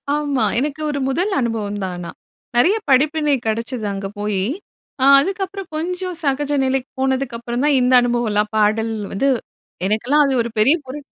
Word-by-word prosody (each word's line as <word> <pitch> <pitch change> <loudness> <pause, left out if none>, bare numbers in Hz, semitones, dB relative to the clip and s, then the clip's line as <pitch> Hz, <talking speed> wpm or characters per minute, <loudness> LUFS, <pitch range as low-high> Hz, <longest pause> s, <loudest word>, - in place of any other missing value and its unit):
ஆமா. 285 -3 0 0.2
எனக்கு 295 +2 -3
ஒரு 285 - -3
முதல் 360 +9 0
அனுபவம் 220 -4 -2
தான். 185 -1 -3
ஆனா, 175 -1 -6 0.5
நெறைய 355 - +5
படிப்பினை 295 +2 +3
கிடைச்சது 230 +1 -2
அங்கே 195 0 -4
போயி, 205 -2 -1 0.6
ஆ - - +5 0.2
அதுக்கப்புறம் 390 +2 -4
கொஞ்சம் 360 +3 -3
சகஜ 285 0 0
நிலைக்கு 260 0 -1
போனதுக்கு 265 -2 0
அப்புறம் 240 +2 -3
தான் 295 - +3
இந்த 250 +1 +3
அனுபவம்லாம், 230 -4 0
பாடல் 220 +1 +2 0.2
வந்து 270 +8 +1 0.6
எனக்கெல்லாம் 245 +8 +2
அது 275 - +1
ஒரு 235 - -4
பெரிய 270 +9 +5
புரட் 275 +3 -7
260 Hz, 155 wpm, -20 LUFS, 225-295 Hz, 0.6 s, நெறைய